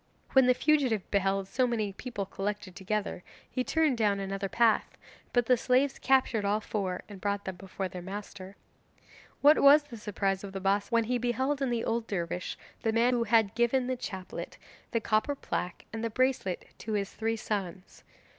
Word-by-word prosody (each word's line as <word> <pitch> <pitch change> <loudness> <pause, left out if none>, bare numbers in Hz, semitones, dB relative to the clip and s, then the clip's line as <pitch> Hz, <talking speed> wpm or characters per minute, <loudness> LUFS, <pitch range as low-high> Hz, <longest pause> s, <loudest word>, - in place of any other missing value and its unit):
When 265 -2 +6
the 250 - +5
fugitive 265 -10 +2
beheld 195 -1 +1
so 255 +5 +1
many 215 -4 -1
people 205 -2 -5
collected 195 -1 -4
together, 200 -1 -2 0.3
he 255 - -2
turned 305 -4 +1
down 205 -2 +2
another 195 0 -3
path, 230 -1 +2 0.3
but 245 -1 +2
the 250 - +5
slaves 260 +3 +2
captured 260 -4 +2
all 205 +1 +1
four 195 -4 -3
and 200 -3 -11
brought 200 0 -1
them 190 - -4
before 190 +1 -5
their 180 -1 -8
master. 195 0 -8 0.9
What 295 +2 +7
was 290 +2 +8
the 250 -5 -10
surprise 195 -2 -1
of 195 -1 -7
the 195 - -3
Bassa 200 +1 +1
when 230 -1 +3
he 245 +2 0
beheld 260 +4 0
in 270 - +1
the 235 -1 -1
old 230 0 -1
dervish 175 -2 -3 0.2
the 225 - +1
man 235 +3 +3
who 235 -1 +1
had 220 -2 +3
given 240 +2 +2
the 255 +1 -1
chaplet, 190 -6 -6 0.3
the 230 - 0
copper 220 +6 +1
plaque, 180 -9 -4
and 225 0 -4
the 230 - 0
bracelet 255 -6 0
to 220 - -4
his 200 -1 -1
three 225 0 -1
sons. 195 -4 -5
215 Hz, 185 wpm, -30 LUFS, 195-245 Hz, 0.9 s, was